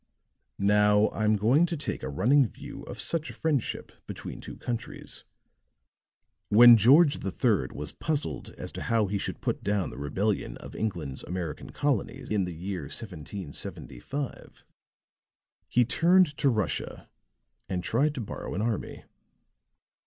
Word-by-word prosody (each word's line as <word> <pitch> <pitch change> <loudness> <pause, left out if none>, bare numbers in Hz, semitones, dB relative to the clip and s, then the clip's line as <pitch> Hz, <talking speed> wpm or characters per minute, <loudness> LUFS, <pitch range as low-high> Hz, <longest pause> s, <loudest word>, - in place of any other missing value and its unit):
"Now, 105 +1 +4
I'm 110 0 +2
going 125 - +4
to 170 - -3
take 145 - -3
a - - -4
running 125 - +4
view 140 +4 -10
of - - -8
such 165 -1 -1
a - - -7
friendship 150 -7 -1 0.2
between - - -7
two - - -9
countries. 120 -2 -5 1.2
When 120 +3 +10
George 140 - +5
III 100 - +1
was 75 0 -5
puzzled 150 -2 -3
as - - -6
to - - -7
how 115 -2 +2
he 100 +1 -2
should - - -4
put - - -2
down 100 -3 0
the - - -9
rebellion 95 - -1
of - - -11
England's 85 -11 -3
American 90 -3 -5
colonies 140 -7 -1
in 105 -3 +1
the 90 -2 -6
year 90 -1 -4
1775, 95 - -6 1.1
he 125 0 +4
turned 170 +3 +4
to 140 - +3
Russia 110 -5 -2 0.6
and 90 -2 -2
tried 145 +9 +1
to 130 - -3
borrow 105 - -6
an 100 - -1
army. 115 -2 -3
110 Hz, 140 wpm, -28 LUFS, 95-140 Hz, 1.2 s, When